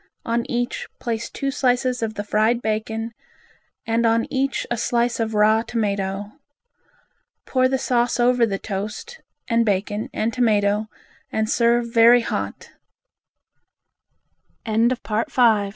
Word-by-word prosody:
On 235 0 -1
each, 245 0 -2
place 230 -2 -3
two 275 0 -3
slices 250 -2 +1
of 220 -1 -2
the 205 - -3
fried 215 +3 +1
bacon 220 +1 -2 0.7
and 230 +1 +1
on 230 0 +2
each 270 0 0
a - - +2
slice 235 +1 0
of 225 -1 -1
raw 215 +1 +4
tomato. 200 -3 -2 1.1
Pour 255 -1 +2
the 265 +1 0
sauce 245 -2 0
over 245 0 +3
the 195 -2 -2
toast 215 - -6 0.3
and 230 -1 +2
bacon 205 0 -1
and 225 +1 -1
tomato, 215 -3 +2 0.4
and 220 0 0
s 235 - -1
230 Hz, 110 wpm, -22 LUFS, 215-245 Hz, 1.1 s, raw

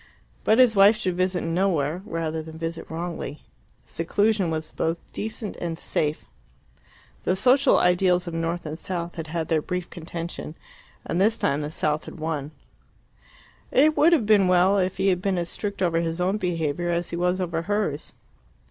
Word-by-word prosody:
But 220 - +4
his 250 -4 +6
wife 200 +2 +7
should 185 -5 -2
visit 185 0 0
nowhere 165 -2 0
rather 160 -1 -2
than 160 0 -10
visit 165 0 -5
wrongly: 165 -3 -5 0.4
seclusion 200 +2 +1
was 160 -1 -3
both 165 +1 -1 0.2
decent 215 -1 -5
and 170 -2 -4
safe. 150 -1 -2 1.0
The 185 - +1
social 260 +6 +4
ideals 180 0 +3
of 170 - -6
North 165 +1 -2
and 155 +2 -5
South 175 -2 -4
had 165 -1 -6
had 160 0 -3
their 160 -2 +1
brief 180 +2 -4
contention, 170 -2 -6 0.5
and 175 - -1
this 220 +3 +3
time 140 +2 0
the 145 - -3
South 150 -1 -1
had - - -10
won. 155 -3 -3 1.2
It 305 +4 +4
would 325 +3 +5
have 300 -10 +3
been 205 -3 +5
well 185 +2 +4
if 185 -1 -1
he 195 +1 +2
had 180 -1 +1
been 195 -1 0
as 170 -1 -1
strict 200 -2 -3
over 165 -2 +2
his 165 0 -2
own 185 +3 +1
behaviour 175 -3 -1
as 175 0 -1
he - - -2
was 180 +2 0
over 170 -3 -1
hers. 200 -5 -2
175 Hz, 175 wpm, -25 LUFS, 165-195 Hz, 1.2 s, wife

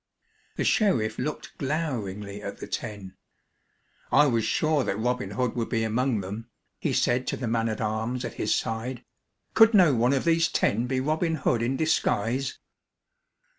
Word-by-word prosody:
The - - -1
sheriff 115 - +2
looked 150 - -4
gloweringly 105 - -3
at 100 -1 -6
the - - -7
ten. 100 -5 -6 0.9
"I 145 +2 +6
was 115 -5 +1
sure 155 +2 +1
that 100 - -2
Robin 125 +3 -1
Hood 125 -2 -1
would 115 -2 -2
be 115 -2 0
among 115 0 0
them," 105 +5 -7 0.3
he - - -1
said 125 +1 +1
to - - -1
the 125 - -3
man 115 0 0
at 110 - -3
arms 110 +3 -2
at - - -5
his - - +2
side. 115 +3 -3 0.5
"Could 225 0 +6
no 175 -7 +6
one 120 +2 +2
of 135 - +1
these 165 0 +3
ten 115 +4 +1
be 130 0 0
Robin 160 +4 0
Hood 125 -5 0
in 125 +3 0
disguise?" 130 -4 0
125 Hz, 170 wpm, -26 LUFS, 110-140 Hz, 0.9 s, I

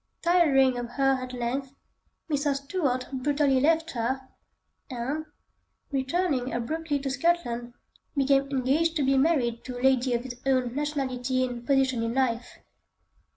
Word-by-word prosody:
Tiring 275 -8 +4
of 240 -1 -5
her 270 -1 +2
at 255 0 -6
length, 255 +2 -3 0.5
Mr. 290 -2 0
Stuart 275 -3 -1
brutally 280 0 +2
left 325 +3 +2
her, 250 +2 -1 0.7
and, 265 +5 -3 0.7
returning 270 -1 0
abruptly 300 +5 -2
to 275 -1 -3
Scotland, 250 -5 0 0.4
became 275 0 +3
engaged 280 +5 +1
to 295 - +1
be 270 0 +3
married 265 -5 +2
to 250 -1 -6
a - - -7
lady 260 -2 +3
of 235 - -2
his 245 -1 -8
own 255 -3 +1
nationality 260 -3 -1
and 240 -1 -7
position 265 -3 +2
in 230 +1 -2
life. 245 -2 -1
265 Hz, 140 wpm, -27 LUFS, 250-290 Hz, 0.7 s, Tiring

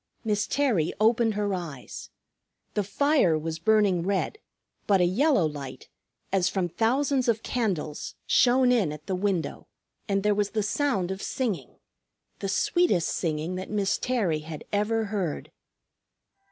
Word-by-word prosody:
Miss 210 -2 0
Terry 240 - +1
opened 225 0 +3
her 205 -1 0
eyes. 165 -8 -6 0.6
The 210 - +1
fire 205 - +2
was 160 +1 -4
burning 205 -2 +3
red; 195 - -1 0.5
but 195 -2 +4
a 180 - +4
yellow 215 - +3
light, 145 -4 -6 0.4
as 190 -2 +3
from 185 -3 -1
thousands 260 - +1
of 225 -2 +1
candles, 185 -11 -2
shone 250 0 +4
in 220 -11 +2
at 150 0 -9
the 190 - -3
window, 185 -2 -2 0.4
and 195 -1 +1
there 210 0 +3
was 205 0 0
the 215 - +2
sound 210 -5 0
of 190 0 -5
singing, 230 -9 -3 0.6
the 195 - -3
sweetest 200 - +2
singing 160 +1 -2
that 185 - -6
Miss 200 -2 0
Terry 210 -11 0
had 155 0 -8
ever 220 +2 +1
heard. 195 -7 -3
200 Hz, 145 wpm, -27 LUFS, 175-225 Hz, 0.6 s, but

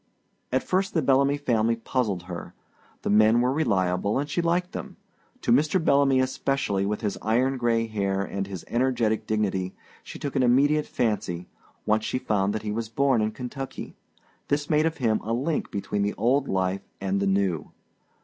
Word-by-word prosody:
At 130 0 +1
first 190 +1 0
the 160 - +2
Bellamy 140 +1 +3
family 115 -5 +1
puzzled 115 -5 -2
her. 90 -2 -8 0.5
The - - 0
men 110 +2 +5
were 125 +2 +2
reliable 100 - +1
and 145 +2 -1
she 150 +4 -1
liked 175 +2 0
them; 200 -4 -7 0.4
to 120 - 0
Mr. 150 +8 +3
Bellamy 140 -4 +3
especially, 130 -6 0
with 105 +1 -2
his 105 -3 -2
iron 125 +5 +1
gray 115 -2 +1
hair 100 -3 -1
and 100 0 -4 0.2
energetic 120 -3 0
dignity, 95 -4 -1 0.3
she - - -9
took 140 -1 -5
an 135 - +3
immediate 140 +5 +3
fancy, 90 -6 -2 0.4
once 110 0 +2
she - - -1
found 100 -5 0
that 110 - -3
he 105 - -2
was 110 +1 -3
born 135 0 +2
in 110 - +1
Kentucky; 130 +4 -7 0.5
this 145 +1 -1
made 155 +1 +4
of 160 - -3
him 115 -5 +1
a 115 - -2
link 145 +6 -1
between 100 +1 -2
the 100 +1 0
old 130 +6 +2
life 95 0 0 0.2
and 95 0 -1
the 100 - 0
new. 95 -5 0
115 Hz, 180 wpm, -26 LUFS, 100-140 Hz, 0.5 s, men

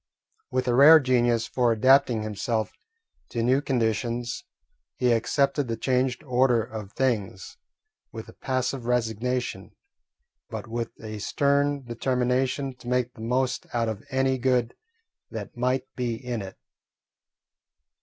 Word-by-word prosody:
With 130 0 -1
a 120 - +2
rare 150 +6 +9
genius 120 -4 +2
for 125 -2 +1
adapting 120 0 +4
himself 110 +1 -2 0.6
to 115 -1 -2
new 130 +4 +3
conditions, 120 -2 -1 0.5
he 125 -1 +2
accepted 140 +4 +1
the 115 -1 -3
changed 130 +2 0
order 125 -3 +2
of 105 -3 -8
things 105 -7 -2 0.5
with - - -8
a - - -12
passive 130 -1 -2
resignation, 125 +1 -2 0.7
but - - -6
with 115 0 -3
a 110 -1 -6
stern 140 +3 +1
determination 125 +2 0
to 120 - -13
make 125 0 0
the - - -12
most 125 +2 -1
out 115 -1 +1
of 110 -1 -5
any 130 -1 +1
good 125 -2 +1 0.5
that - - -7
might 125 +2 0
be 120 -2 -1
in 120 -1 -4
it. 95 -1 -9
125 Hz, 130 wpm, -26 LUFS, 115-130 Hz, 0.7 s, rare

